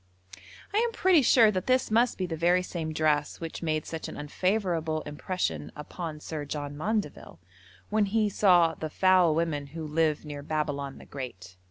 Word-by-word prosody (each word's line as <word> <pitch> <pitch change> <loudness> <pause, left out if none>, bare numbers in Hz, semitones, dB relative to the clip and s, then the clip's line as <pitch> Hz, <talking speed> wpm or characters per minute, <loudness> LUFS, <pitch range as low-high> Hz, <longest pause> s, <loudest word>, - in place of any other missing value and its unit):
I - - +1
am 470 0 +1
pretty 370 -7 +4
sure 230 -3 +6
that 185 -2 -3
this 255 -2 +2
must 235 +2 +3
be 185 - -1
the 170 -2 -4
very 175 +3 +2
same 165 -3 -4
dress 155 -1 0
which 165 -1 -6
made 155 -2 -1
such 160 -1 -5
an - - -8
unfavourable 165 0 -1
impression 145 - -3
upon 155 +1 -6
Sir 150 0 -5
John 145 0 -5
Maundeville, 210 +7 -3 0.5
when 215 -1 +3
he 215 +1 +2
saw 180 -5 +4
'the 155 - -5
foul 185 -2 +4
women 155 -4 -1
who 160 - -4
live 155 0 0
near 145 -1 -6
Babylon 145 -2 -3
the - - -13
great.' 95 -10 -8
160 Hz, 175 wpm, -28 LUFS, 150-190 Hz, 0.5 s, sure